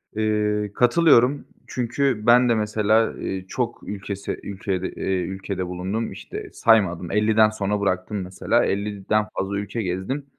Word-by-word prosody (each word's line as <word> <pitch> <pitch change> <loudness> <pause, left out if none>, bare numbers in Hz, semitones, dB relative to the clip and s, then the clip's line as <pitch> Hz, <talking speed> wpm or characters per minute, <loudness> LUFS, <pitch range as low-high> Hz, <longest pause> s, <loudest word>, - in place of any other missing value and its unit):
Eee, 105 -1 0
katılıyorum, 140 0 +4 0.2
çünkü 125 -1 -1
ben 125 +1 +6
de, 115 - +4
mesela, 110 +1 +2
eee, 95 -1 -4
çok 120 +3 -3
ülkesi 100 0 -5
ülkede 95 -1 -3
eee, 95 - -2
ülkede 95 +1 -4
bulundum. 95 +5 -3
İşte, - - -8
saymadım, 95 -7 +2
50'den 110 +1 +4
sonra 105 -1 -2
bıraktım, 100 +1 -1
mesela, 95 0 0
50'den 100 +1 -1
fazla 100 +1 -1
ülke 105 +3 -3
gezdim. 95 +9 -3
105 Hz, 135 wpm, -23 LUFS, 95-115 Hz, 0.2 s, ben